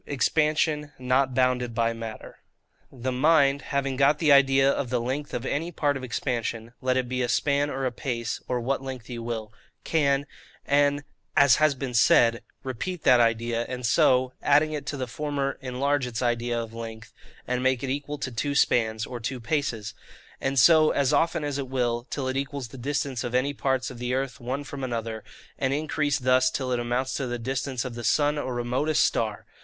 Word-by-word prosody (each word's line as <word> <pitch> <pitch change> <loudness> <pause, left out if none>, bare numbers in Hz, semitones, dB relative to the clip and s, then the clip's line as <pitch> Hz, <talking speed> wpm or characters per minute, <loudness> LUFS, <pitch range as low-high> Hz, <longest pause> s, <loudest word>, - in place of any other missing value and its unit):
Expansion 150 +2 +1
not 130 +1 +1
bounded 125 -2 +1
by 115 0 +1
Matter. 115 -1 -8 0.5
The 130 0 -4
mind, 140 +1 +3
having 140 -2 -2
got 140 +2 +4
the 150 -2 +3
idea 135 -1 +5
of 140 -2 0
the 125 0 0
length 130 +5 -3
of 125 - -4
any 165 +6 -2
part 145 -3 0
of 135 - -5
expansion, 120 -2 -3
let 130 0 +1
it 130 -1 0
be 130 +1 -2
a 120 - 0
span, 145 +3 +1
or 135 -1 -3
a 130 - 0
pace, 120 -2 -3
or 125 -1 -1
what 135 +4 -1
length 130 -3 -7
you 120 -1 -5
will, 115 -2 -5 0.3
CAN, 140 -3 +1 0.4
as 145 -2 +2
has 155 -2 +3
been 130 -1 -5
said, 115 0 +4 0.2
repeat 145 +7 -4
that 125 -1 +6
idea, 115 0 +1
and 125 -1 -4
so, 130 +2 +3
adding 150 +2 +3
it 145 -2 -5
to 145 - -3
the 130 - -2
former, 140 +2 -3
enlarge 135 +1 0
its 125 +1 -3
idea 120 0 0
of 115 -1 -6
length, 115 -1 -8 0.3
and 125 0 -1
make 130 -1 +1
it 130 - -1
equal 145 +1 -3
to 130 -2 -4
two 140 +5 -2
spans, 110 -5 +2
or 125 - -6
two 125 +3 -4
paces; 115 -4 -2 0.5
and 135 +1 -1
so, 155 +5 +6
as 140 0 +1
often 165 +1 +2
as 145 -1 -2
it 135 - -3
will, 120 -1 -1
till 135 -3 -3
it 130 - -2
equals 140 -2 -4
the 135 - -11
distance 135 -1 -2
of 120 0 -3
any 135 +3 +1
parts 130 -2 -1
of 125 - -10
the 125 +1 -1
earth 135 0 -3
one 130 +4 -3
from 140 -1 -7
another, 115 -3 -3 0.4
and 135 0 +1
increase 150 -1 0
thus 130 0 +3
till 130 -1 -3
it 125 - +1
amounts 120 +2 -1
to 135 - -2
the 120 0 -3
distance 130 +2 -3
of 130 - -5
the 120 0 -7
sun 145 +4 +2
or 130 -3 -3
remotest 125 +6 +1
star. 110 -2 -1
130 Hz, 200 wpm, -26 LUFS, 120-140 Hz, 0.5 s, that